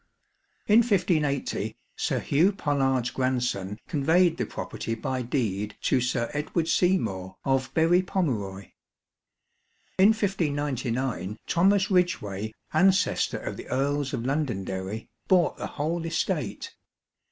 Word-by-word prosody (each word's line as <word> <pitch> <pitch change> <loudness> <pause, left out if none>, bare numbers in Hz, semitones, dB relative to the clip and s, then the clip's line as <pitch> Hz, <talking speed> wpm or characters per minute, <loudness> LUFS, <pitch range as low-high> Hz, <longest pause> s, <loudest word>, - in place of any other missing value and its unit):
In 215 +2 +6
1580, 175 - 0 0.2
Sir - - -1
Hugh 170 +8 +3
Pollard's 135 - 0
grandson 125 -7 -1
conveyed 165 +4 +3
the - - -2
property 115 - -4
by 130 +3 -3
deed 105 -5 -2
to 130 - +2
Sir 120 -1 -1
Edward 155 +3 -1
Seymour, 110 - +1
of 135 -1 +1
Berry 165 +3 +4
Pomeroy. 110 - -2 1.3
In 190 - +8
1599, 140 - -1
Thomas 195 +3 +3
Ridgeway, 110 - 0 0.2
ancestor 185 +4 +3
of - - -5
the - - -9
Earls 140 +1 0
of 115 - -3
Londonderry, 110 -7 -2 0.2
bought 180 -4 +3
the - - -4
whole 165 +3 -2
estate. 165 0 -2
140 Hz, 110 wpm, -26 LUFS, 115-175 Hz, 1.3 s, In